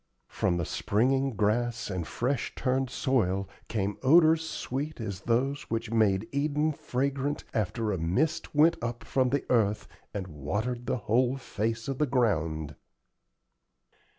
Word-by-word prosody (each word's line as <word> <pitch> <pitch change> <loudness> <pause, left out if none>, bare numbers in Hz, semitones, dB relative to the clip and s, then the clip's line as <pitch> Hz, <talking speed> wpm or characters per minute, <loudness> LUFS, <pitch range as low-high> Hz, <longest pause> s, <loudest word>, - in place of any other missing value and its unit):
From 85 - 0
the 85 - -1
springing 130 - +1
grass 115 +2 0
and 90 -4 -3
fresh 125 +1 -2
turned 130 0 0
soil 100 -9 +1 0.2
came 105 -2 -2
odors 160 +3 +5
sweet 145 +4 -4
as 100 -4 -4
those 130 +6 0
which 115 0 -2
made 110 -2 +2
Eden 150 +2 +1
fragrant 140 +2 -2
after 110 +1 -1
"a 95 - -1
mist 95 - 0
went 160 +3 +5
up 120 0 -4
from 130 -1 +1
the 140 +1 0
earth 105 -3 +2 0.2
and 100 -2 -4
watered 105 - -3
the - - +1
whole 125 +4 +2
face 115 -2 -3
of 135 -1 -3
the 150 - +2
ground." 80 - 0
120 Hz, 140 wpm, -29 LUFS, 105-135 Hz, 0.2 s, odors